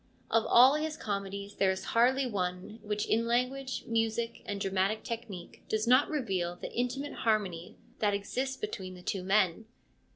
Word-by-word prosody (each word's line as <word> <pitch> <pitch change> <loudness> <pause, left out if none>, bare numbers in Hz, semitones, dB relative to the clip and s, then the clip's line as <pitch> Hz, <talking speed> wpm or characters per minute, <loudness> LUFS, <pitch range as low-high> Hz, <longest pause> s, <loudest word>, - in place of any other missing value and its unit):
Of 225 - +3
all 255 +3 +8
his 305 +1 -2
comedies 200 0 -4
there 195 - +3
is 190 0 -1
hardly 255 +4 +4
one 185 -1 -3
which 210 0 -2
in 230 +1 +1
language, 260 +2 -1
music, 230 0 -1
and 200 -1 -3
dramatic 195 +2 0
technique 225 -7 -7
does 220 0 0
not 255 +4 +5
reveal 190 - -1
the - - -8
intimate 250 +4 -2
harmony 195 -7 -1 0.2
that 205 -2 +2
exists 260 +7 -2
between 190 - -5
the 180 - -13
two 195 - -2
men. 190 +1 +2
220 Hz, 160 wpm, -31 LUFS, 195-245 Hz, 0.2 s, all